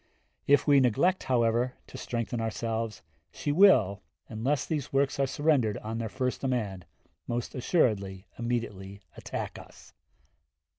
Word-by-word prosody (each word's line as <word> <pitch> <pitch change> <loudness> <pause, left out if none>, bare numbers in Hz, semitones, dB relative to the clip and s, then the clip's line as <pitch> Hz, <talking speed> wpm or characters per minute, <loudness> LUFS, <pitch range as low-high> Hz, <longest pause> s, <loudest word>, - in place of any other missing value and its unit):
If 145 +1 +5
we 145 -2 +6
neglect, 135 - +2
however, 120 0 +1
to - - -14
strengthen 115 0 -3
ourselves, 115 -1 -3 0.3
she 145 - -3
will, 130 - +5 0.3
unless 125 +6 -1
these 150 -5 -3
works 135 0 +1
are 135 - +2
surrendered 135 -6 +1
on 110 +1 -5
their 115 -1 -3
first 130 +2 -2
demand, 105 -9 -2 0.4
most 120 0 -3
assuredly 105 - 0
immediately 105 -5 -4
attack - - -5
us. - - -15
120 Hz, 130 wpm, -29 LUFS, 110-135 Hz, 0.4 s, we